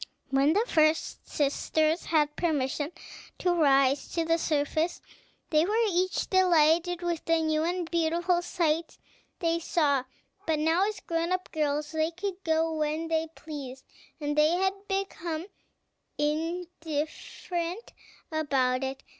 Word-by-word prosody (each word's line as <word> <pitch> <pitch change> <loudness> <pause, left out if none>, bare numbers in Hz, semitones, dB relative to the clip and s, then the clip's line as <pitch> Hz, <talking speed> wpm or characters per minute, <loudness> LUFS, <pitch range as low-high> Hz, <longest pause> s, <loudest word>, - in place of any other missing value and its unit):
When 275 +4 +3
first 310 -6 +1
the - - -22
sisters 310 +2 +1
had 300 -2 +2
permission 295 -2 -1 0.5
to 355 -1 +1
rise 275 -4 +3
to 335 -1 0
the 330 +1 +2
surface, 310 +2 0 0.5
they 305 0 +4
were 415 +5 0
each 365 +1 0
delighted 350 -1 +3
with 345 -2 -2
the 330 0 +3
new 315 -1 +1
and 350 0 -1
beautiful 345 +1 +1
sights 335 -2 -1 0.4
they 335 -1 0
saw; 290 -6 +1 0.4
but 320 -1 +2
now, 325 +6 +2
as 430 - -5
grown 335 +1 -1
up 370 0 -2
girls, 300 -1 -1
they 315 0 +1
could 370 +2 -5
go 320 0 +1
when 310 +1 -1
they 325 0 +1
pleased, 270 -4 -8 0.3
and 295 -1 -2
they 300 0 +5
had 380 +2 +2
become 350 -4 -3 0.7
indifferent 330 +3 -3 0.4
about 270 -5 +1
it. 265 +1 -4
320 Hz, 130 wpm, -28 LUFS, 300-345 Hz, 0.7 s, they